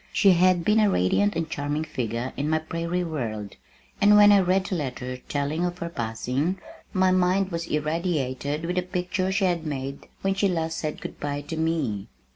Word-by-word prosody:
She 195 - +5
had 180 -1 +4
been 210 +1 +4
a 210 -1 +4
radiant 200 - +2
and 165 -1 -1
charming 150 -1 -2
figure 125 -4 -3
in 145 +2 -2
my 160 - +3
prairie 170 +3 -2
world, 110 - -4 0.5
and 210 +1 +7
when 205 0 +8
I 200 - +7
read 185 +1 +2
the 195 - -3
letter 130 -4 -4
telling 145 +4 -1
of 175 0 -2
her 170 -1 -4
passing, 125 +6 -2 0.3
my 185 -1 +3
mind 185 +1 +2
was 170 0 -3
irradiated 150 -2 -1
with 180 +2 -2
the - - +3
picture 180 +1 -2
she 195 0 +1
had 175 -3 0
made 140 -2 -5 0.2
when 195 0 +2
last 165 -5 0
she - - -3
said 155 -1 -4
good - - -7
bye 145 0 -3
to 155 +3 -6
me. 155 -11 -1
165 Hz, 195 wpm, -25 LUFS, 145-185 Hz, 0.5 s, when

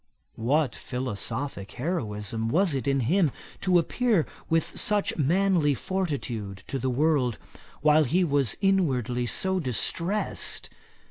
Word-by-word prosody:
What 135 +3 0
philosophick 125 -2 -4
heroism 115 - -2
was 175 +4 +2
it 135 -2 -2
in 135 -1 +2
him 160 - +2 0.3
to 185 -2 +3
appear 210 0 +1 0.2
with 165 0 0
such 210 -1 +2
manly 165 -1 +2
fortitude 120 - -3
to 135 - -2
the 130 +1 -1
world, 130 -3 +1 0.4
while 155 +1 +5
he 175 +8 +2
was 140 -6 +2
inwardly 130 - +1
so 190 +8 +2
distressed! 170 - -1
145 Hz, 120 wpm, -26 LUFS, 125-180 Hz, 0.4 s, while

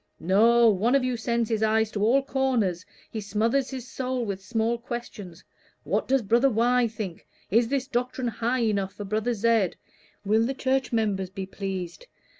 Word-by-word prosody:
No; 230 +7 +4
one 220 +5 +3
of 275 - +3
you 255 -1 0
sends 235 0 -1
his 220 -1 -1
eyes 220 0 +2
to 205 - -2
all 260 +5 +4
corners, 245 -10 0 0.3
he 220 - -4
smothers 225 +6 0
his 255 -2 -7
soul 255 -1 -3
with 195 -2 -4
small 230 +2 -1
questions, 230 -7 -7 0.4
'What - - -1
does 270 -2 +2
brother 235 +6 +3
Y. 240 +1 +2
think?' 210 -6 -7 0.2
'Is 230 +3 +4
this 275 +1 -1
doctrine 250 -1 -2
high 235 +3 -1
enough 200 -3 0
for 205 - -6
brother 215 +4 -1
Z.?' 220 -3 +2 0.5
'Will 215 +3 +3
the 270 - -3
church 265 0 0
members 205 -5 0
be 190 0 -6
pleased?' 190 - -6
230 Hz, 175 wpm, -26 LUFS, 205-250 Hz, 0.5 s, No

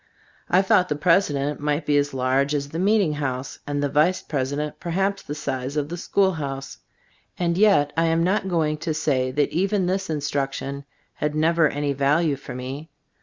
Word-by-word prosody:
I 185 +2 +4
thought 185 -1 +3
the 150 - 0
president 150 -3 +1
might 150 +2 -1
be 145 - +2
as 145 0 +1
large 135 +2 +1
as 140 -1 -2
the 165 - -5
meeting 200 -4 +3
house, 135 -3 -4
and 145 0 -1
the - - +2
vice 155 +6 +2
president 145 +1 -3
perhaps 195 +3 -1
the 145 - -6
size 130 -1 -3
of 145 0 -1
the 175 - -4
school 190 +2 +1
house. 135 -5 -5 0.6
And 170 -1 0
yet 195 -7 +4
I 165 +1 +2
am 165 0 +2
not 190 +2 +1
go 165 -3 +2
ing 150 0 -1
to 155 0 -3
say 130 -4 +1
that 145 +2 0
even 195 +2 +1
this 190 +1 -1
instruction 140 -2 -3 0.3
had 150 0 -2
never 165 +1 +3
any 145 0 -1
value 145 +3 +2
for 135 - -9
me. 135 +5 -6
150 Hz, 190 wpm, -23 LUFS, 140-170 Hz, 0.6 s, I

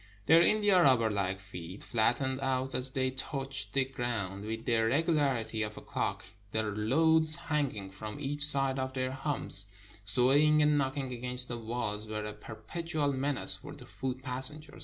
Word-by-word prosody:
Their 165 +6 +6
india 205 0 +3
rubber 125 -7 +3
hke 95 -2 -2
feet 95 -1 -10
flattened 125 +4 0
out 135 0 -2
as 130 +1 +2
they 130 0 -1
touched 135 -6 -4
the 135 -1 +2
ground 115 -7 -4
with 110 +1 -6
the 120 - 0
regularity 130 -3 0
of 105 0 -4
a - - -8
clock; - - -4 0.3
the 110 0 -1
loads 155 +10 +3
hanging 145 - -3
from 105 +5 -8
each 145 +1 0
side 135 -2 +4
of 130 0 -4
their 130 0 -2
humps, 135 -8 +2 0.4
swaying 135 +9 +4
and 150 0 +3
knocking 135 -2 -2
against 125 +1 +1
the 120 -1 -4
walls, 110 -2 -4
were 105 0 -5
a 105 - -6
perpetual 145 +7 -4
menace 135 +1 +3
for 145 -1 -11
the 145 - -13
foot 130 -1 -6
passenger. 140 +3 +1
130 Hz, 165 wpm, -30 LUFS, 110-145 Hz, 0.4 s, Their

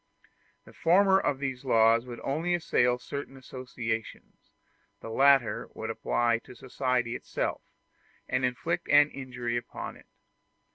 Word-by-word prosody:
The - - -15
former 190 +3 +4
of 145 -7 0
these 135 -2 -4
laws 115 -1 +4
would 120 -1 -7
only 165 +6 0
assail 125 -7 +2
certain 135 +1 -7
associations; 125 -4 -6 0.5
the 115 - -8
latter 135 -1 +3
would - - -4
apply 120 -1 +1
to 125 - -14
society 125 -1 -1
itself, - - -3 0.7
and 130 0 -1
inflict 165 +8 -1
an 145 +1 +6
injury 120 -3 -4
upon 120 - -6
it. - - -20
130 Hz, 130 wpm, -28 LUFS, 120-140 Hz, 0.7 s, an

